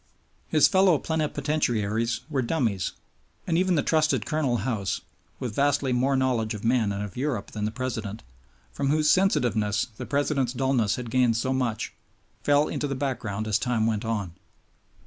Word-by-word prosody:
His - - +5
fellow 190 -4 +4
plenipotentiaries 135 -8 -1
were 145 -4 0
dummies; 115 - -1 0.5
and 170 - 0
even 185 +1 +2
the 145 - +2
trusted 155 -1 +2
Colonel 145 -6 0
House, 105 -7 -1 0.4
with 120 -4 -4
vastly 140 0 +2
more 130 +3 +2
knowledge 120 -5 0
of 105 - -8
men 115 -3 +2
and 100 +1 -3
of 100 -3 -7
Europe 125 -5 -2
than 105 -1 -3
the 105 - -1
President, 115 -4 -4 0.5
from 140 - -2
whose 150 +1 +3
sensitiveness 110 - +2
the - - -6
President's 140 -3 0
dullness 130 -5 +1
had 125 -3 -6
gained 125 -3 +3
so 130 +3 0
much, 125 -4 -2 0.5
fell 145 +1 +3
into 145 - -2
the 135 - -2
background 115 -6 -3
as 110 0 +2
time 120 -3 0
went 110 -1 0
on. 105 -6 -2
125 Hz, 165 wpm, -26 LUFS, 110-145 Hz, 0.5 s, His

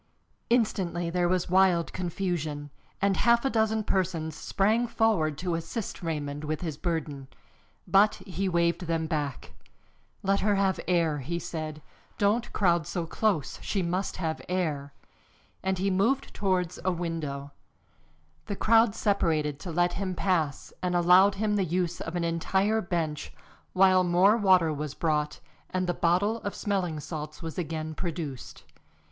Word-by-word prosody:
Instantly 185 -8 +1
there 175 0 +1
was 180 -1 +1
wild 185 -2 +3
confusion, 165 -5 -3 0.3
and 200 -1 +3
half 235 +2 +3
a 270 - +2
dozen 220 -1 +1
persons 170 -6 -1
sprang 215 +8 +1
forward 195 -11 +1
to 180 -1 -2
assist 165 +6 -4
Raymond 150 -3 -3
with 155 0 -3
his 160 -5 -3
burden. 155 -4 -3 0.6
But 205 +2 +5
he 190 +1 -2
waved 170 0 +1
them 165 -1 0
back. 145 -4 -3 0.7
"Let 195 +1 +2
her 205 0 +2
have 195 -1 +1
air," 165 -4 +2
he 170 +6 -3
said. 155 -2 -5 0.3
"Don't 215 +4 +1
crowd 175 -5 +2
so 175 -3 -2
close. 190 -3 -1
She 195 -3 -1
must 180 +3 -2
have 160 -3 -2
air," 155 -6 -1 0.7
and 190 0 0
he 195 +2 0
moved 230 +9 +1
towards 180 -3 -1
a 185 - +2
window. 160 -5 -4 1.0
The 200 - -2
crowd 225 +1 +4
separated 155 -8 +1
to 175 - -6
let 175 +2 +2
him 190 -2 -3
pass 165 -7 -1
and 180 -1 0
allowed 180 +3 +6
him 210 +1 0
the 195 - +2
use 175 0 -1
of 165 - -5
an 175 - 0
entire 190 +6 +1
bench, 165 -5 -2 0.4
while 185 0 +5
more 180 +4 +4
water 185 -7 +4
was 150 0 -5
brought 150 -2 0 0.3
and 185 0 -1
the 175 - 0
bottle 185 +7 +2
of 205 -3 -5
smelling 185 -6 -1
salts 150 +1 -7
was 165 +2 -5
again 160 -1 -3
produced. 155 -6 -5
175 Hz, 150 wpm, -28 LUFS, 160-195 Hz, 1.0 s, allowed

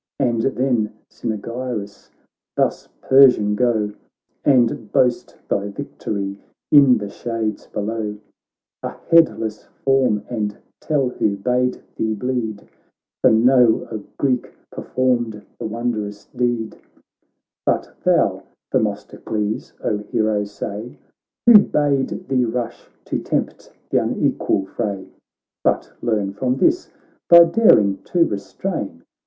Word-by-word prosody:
And 120 -4 +1
then 125 -4 0 0.2
Cynaegirus: 115 -1 -5 0.2
' - - -68
Thus, - - 0
Persian, 125 -6 +6
go 110 -2 +1 0.5
And 125 -4 +2
boast 125 -1 +1
thy 100 0 -1
victory 100 0 -5 0.3
in 140 -4 +7
the 105 -1 -5
shades 110 0 -4
below, 105 0 -3 0.6
A - - -3 0.2
headless 115 -10 +3 0.2
form, 130 -6 +3
and 105 -4 -3 0.2
tell 140 -4 0
who 100 -4 -1
bade 125 +4 0
thee 110 -1 0
bleed, 110 -3 -3 0.5
For - - +6
know 120 0 +4
a 110 - -3 0.2
Greek 130 -3 0 0.2
performed 120 -4 -1
the - - -3
won 120 +2 -2
drous 105 -2 -6
deed: 120 -3 -1 0.8
But - - -1
thou, - - +2 0.3
Themistocles, 105 0 -2
O 105 - 0
hero! 105 -1 -1
say 105 +3 -7 0.5
Who 235 -3 +10
bade 145 -7 0
thee 130 -2 +2
rush, 120 +1 -4 0.2
to - - -2
tempt - - -3 0.2
th' - - -20
unequal 95 - 0
fray! 95 0 -4 0.5
But - - 0
learn 105 -4 -1
from 125 +4 -1
this 335 - +1 0.4
thy 170 0 +10
daring 165 - +4
to 170 -2 +3
restrain. 100 - -4
115 Hz, 115 wpm, -21 LUFS, 105-130 Hz, 0.8 s, Who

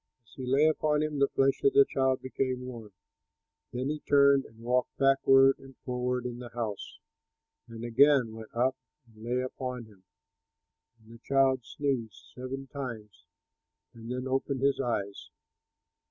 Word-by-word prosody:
As 115 - -22
he 130 -1 -7
lay 135 +4 +4
upon 155 -1 +1
him, 150 -2 -3
the 140 - +4
flesh 135 0 +1
of 410 - +4
the 415 0 +7
child 130 - 0
became 130 -1 -2
warm. 115 -4 -9 0.8
Then 125 +3 -3
he 155 - -4
turned 140 -1 +4
and 110 - -17
walked 125 +2 -1
backward 135 0 +5
and 135 -1 -15
forward 125 0 -2
in 120 -1 -5
the 125 -1 -8
house, 115 -3 -5 0.7
and 115 -1 -9
again 125 -1 +4
went 110 -1 -10
up 130 +3 +1 0.3
and 110 -2 -17
lay 125 +2 -1
upon 125 -1 -5
him, 100 -4 -20 0.9
and 110 0 -17
the 115 - -14
child 135 -1 +2
sneezed 130 -7 -4
seven 130 +2 -6
times, 115 - -8 0.7
and 115 +1 -9
then 125 +1 -3
opened 135 0 -1
his 140 0 +2
eyes. 100 -6 -3
130 Hz, 155 wpm, -29 LUFS, 115-135 Hz, 0.9 s, the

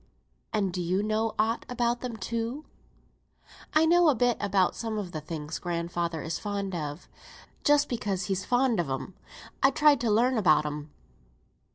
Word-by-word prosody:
"And 195 -4 0
do 180 - -2
you 185 +4 0
know 215 +1 0
aught 225 +2 +1
about 240 -1 0
them, 245 -3 -5
too?" 230 +6 -3 1.1
"I 310 +1 +6
know 345 0 +5
a 285 - +3
bit 245 0 +2
about 195 -2 +1
some 225 -2 -3
of 195 -4 -4
the 155 - -5
things 155 0 -5
grandfather 170 -2 -2
is 160 - -3
fond 200 -2 -3
on; 150 -1 -4 0.6
just 290 0 +4
because 205 -6 -2
he's 190 0 -2
fond 245 -2 +2
on 165 -5 -1
'em 135 +8 -4 0.5
I 270 - +6
tried 295 -2 +4
to 235 - +1
learn 235 +3 +3
about 155 -7 +4
them." 150 0 -5
210 Hz, 170 wpm, -28 LUFS, 175-240 Hz, 1.1 s, I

